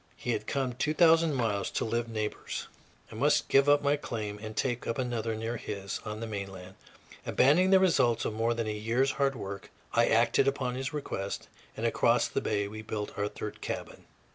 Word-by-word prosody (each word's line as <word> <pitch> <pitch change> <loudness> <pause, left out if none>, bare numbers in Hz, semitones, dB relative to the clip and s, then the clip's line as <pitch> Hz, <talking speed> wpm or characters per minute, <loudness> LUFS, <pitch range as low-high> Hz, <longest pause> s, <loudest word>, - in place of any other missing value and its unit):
He 120 - -2
had 110 -2 -2
come 135 -3 -1
two 150 +5 -1
thousand 165 -2 +5
miles 105 -6 0
to - - -2
live 115 +1 -1
neighbors; 110 -2 -4 0.4
I - - -9
must - - +2
give 135 +1 +5
up 145 0 +5
my 145 +1 +3
claim 105 -6 -5
and 110 0 -7
take 120 -2 -1
up 115 - -1
another 120 -3 -1
near 115 +2 -3
his, 100 -2 -5
on 105 +1 -5
the - - -2
mainland. 95 -3 -6 0.5
Abandoning 175 +8 +4
the 190 0 +7
results 125 -11 +3
of - - -1
more 115 +2 0
than 115 -1 -1
a 110 - -2
year's 115 +6 +1
hard 135 -1 +1
work, 100 -3 -7 0.2
I - - +4
acted 135 - +3
upon 135 -2 0
his 130 +1 -3
request, 100 -9 -4 0.3
and - - -2
across - - +3
the - - -2
bay 100 -1 0
we 110 +1 -7
built 105 -1 -5
our 105 0 -1
third 105 0 -7
cabin. - - -6
115 Hz, 200 wpm, -30 LUFS, 105-135 Hz, 0.5 s, the